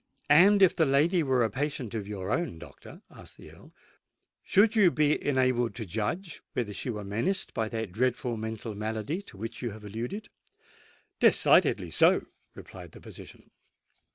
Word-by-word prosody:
"And 195 +6 +6
if 185 - +5
the 160 - +2
lady 155 +6 +2
were 130 -5 +1
a 110 - -1
patient 140 -5 -4
of 105 -3 -4
your 100 -1 -5
own, 170 - -2
doctor," - - -14
asked - - -13
the - - -14
Earl, - - -17 0.7
"should 210 +3 +3
you 205 -5 +6
be 150 -2 +1
enabled 130 -3 +1
to 115 - -5
judge 115 - -4
whether 110 -4 -3
she 125 - -5
were 105 -3 -4
menaced 115 - -2
by 110 -1 -2
that 110 -4 -4
dreadful 120 +2 -1
mental 110 0 -6
malady 110 - -4
to 200 - -14
which 115 +3 -7
you 120 - -2
have 105 0 -11
alluded?" 120 - -6 0.9
"Decidedly - - +4
so," - - +4 0.3
replied - - -12
the - - -12
physician. - - -13
120 Hz, 165 wpm, -28 LUFS, 110-160 Hz, 0.9 s, And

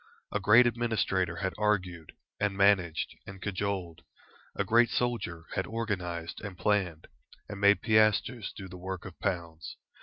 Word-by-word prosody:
A 105 - 0
great 105 +5 +6
administrator 110 -7 0
had 95 +2 -2
argued, 90 -6 -1 0.3
and 100 -1 0
managed, 95 -5 +2
and 95 0 -9
cajoled; 95 -4 -3 0.5
a - - 0
great 120 +1 +4
soldier 100 -11 -2
had 95 - -2
organised 90 -7 -4
and 95 -3 -7
planned, 95 -7 0 0.4
and 100 -1 -7
made 100 0 +5
piastres 110 +1 +2
do 95 - -9
the 90 0 -10
work 95 0 -6
of 95 -3 -10
pounds. 85 -2 -4
95 Hz, 145 wpm, -29 LUFS, 90-105 Hz, 0.5 s, great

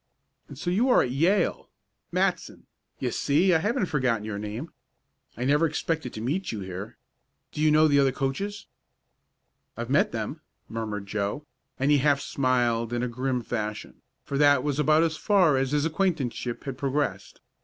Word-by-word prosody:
And 140 - -11
so 175 +5 -2
you 230 +8 +2
are - - +5
at 125 - -3
Yale 170 +9 +1 0.4
Matson - - -1 0.3
you - - -2
see 170 +6 +2
I 160 - +4
haven't 210 +5 0
forgotten 130 - 0
your 105 -1 -4
name. 110 +9 -6 0.7
I 120 - -3
never 150 +4 +3
expected 160 -3 -2
to 110 - -6
meet 155 +11 -2
you 105 - -5
here. 95 +2 -7 0.5
Do 150 - -5
you 155 - +4
know 155 +1 +5
the 145 -1 +4
other 135 -1 +4
coaches?" 150 +11 -3 1.1
"I've - - -4
met - - +3
them," - - -4 0.3
murmured 110 -3 -4
Joe, 105 +8 -3 0.3
and 135 +2 +1
he 145 - +5
half 140 0 +3
smiled 120 -4 0
in 120 0 -1
a - - 0
grim 125 +1 -2
fashion, 105 -2 -5 0.2
for 140 - -3
that 145 -3 +5
was 145 -1 -1
about 155 +2 +4
as 160 -2 0
far 185 -8 +3
as 135 0 +1
his 150 0 +1
acquaintanceship 155 -9 -1
had 135 -3 -6
progressed. 135 -8 -2
140 Hz, 175 wpm, -26 LUFS, 120-155 Hz, 1.1 s, are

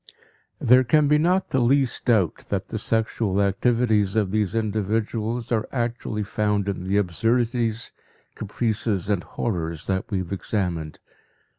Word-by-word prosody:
There 125 +2 +5
can 145 +4 +3
be 150 +1 +4
not 180 +4 +1
the 130 - +2
least 130 0 +2
doubt 100 -9 +1
that 100 0 -2
the 110 - -3
sexual 110 -2 0
activities 105 0 +2
of 105 -4 +1
these 105 -1 0
individuals 110 +2 -1
are 110 -2 0
actually 115 -3 -2
found 105 0 -1
in 95 -2 -3
the 100 +2 +1
absurdities, 115 +4 0 0.4
caprices 110 -2 -2
and 100 -4 +1
horrors 85 -8 -3
that 95 -1 -2
we 100 - -1
have 95 -1 -4
examined. 90 -6 -2
110 Hz, 140 wpm, -24 LUFS, 100-120 Hz, 0.4 s, There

